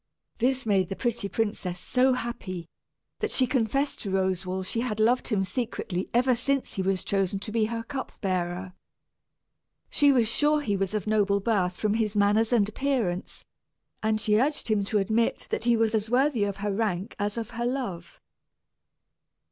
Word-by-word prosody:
This 260 +2 +1
made 195 -4 +2
the 195 - -3
pretty 235 -4 -1
princess 205 -5 -2
so 255 +7 +2
happy, 190 -8 -5 0.5
that 435 - -1
she 260 - +4
confessed 260 +3 0
to 200 - -3
Roswal 190 0 -1
she 225 +5 -2
had 220 -4 -3
loved 240 +4 +3
him 205 -4 +1
secretly 195 -4 -3
ever 250 +2 +3
since 270 +3 -1
he 195 - -2
was 190 0 0
chosen 195 -1 0
to 205 +2 -6
be 220 -1 +2
her 230 +1 -3
cup 265 +3 -5
bearer. 185 -1 -2 1.2
She 285 -1 +5
was 240 -5 +3
sure 295 +6 +2
he 205 -8 0
was 195 +1 -1
of 210 - -2
noble 205 -2 +2
birth 190 -4 0
from 210 -1 0
his 220 -1 0
manners 210 +3 +3
and 220 -5 +3
appearance; 215 -6 -2 0.6
and 215 0 +1
she 210 0 +3
urged 290 0 0
him 210 -2 +2
to 210 - 0
admit 220 +3 +1
that - - -1
he 240 -1 +4
was 225 -1 +2
as 220 0 0
worthy 250 -3 +2
of 200 -1 -3
her 205 - 0
rank 195 -3 -2
as 205 +2 -1
of 225 -1 -4
her 235 0 -3
love. 245 -9 -4
215 Hz, 180 wpm, -27 LUFS, 195-240 Hz, 1.2 s, She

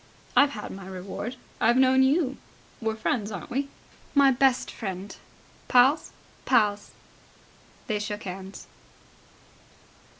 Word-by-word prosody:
"I've 285 - +6
had 210 - -6
my 190 -1 -9
reward. 190 +6 -6 0.2
I've 235 +2 +4
known 260 0 +5
you. 270 0 +2 0.4
We're 220 -1 -1
friends, 220 -1 -1
aren't 195 -1 -7
we?" 275 +3 -1 0.5
"My 280 -1 +6
best 260 0 +2
friend." 195 -2 -6 0.5
"Pals?" 255 +5 +4 0.3
"Pals!" 205 -2 +2 1.0
They 215 -2 -1
shook 210 +1 -4
hands. 190 +1 -8
220 Hz, 110 wpm, -26 LUFS, 200-265 Hz, 1.0 s, I've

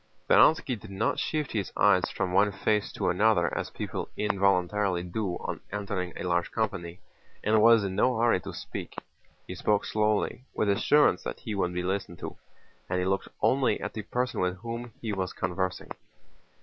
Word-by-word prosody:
Speránski 135 -7 +4
did 105 - -12
not 100 +3 -1
shift 155 -3 -2
his 100 -4 -2
eyes - - +4
from 90 -1 -2
one 100 +2 +4
face 105 +2 0
to - - 0
another 95 -2 +2
as - - -3
people - - -5
involuntarily 100 -2 +1
do 90 +1 -3
on - - -5
entering 100 -3 -3
a - - -5
large 85 -1 0
company 95 -6 -3 0.4
and 110 0 +3
was 115 -1 +6
in 95 -1 -3
no 125 +4 +2
hurry 115 -4 +3
to - - -7
speak. - - -7 0.5
He - - -6
spoke 105 -1 +1
slowly, 105 +3 0
with 105 - +1
assurance 100 0 +4
that - - -6
he 110 - -4
would 90 -3 -1
be 90 - -1
listened 95 -2 -2
to, - - -7 0.5
and 90 - 0
he 90 - 0
looked 95 +1 0 0.2
only 135 0 +3
at - - -5
the 110 - -4
person 125 +4 -2
with 90 0 0
whom 115 +1 -5
he 110 -2 -3
was 95 -2 -2
conversing. 95 0 -3
100 Hz, 180 wpm, -28 LUFS, 90-110 Hz, 0.5 s, was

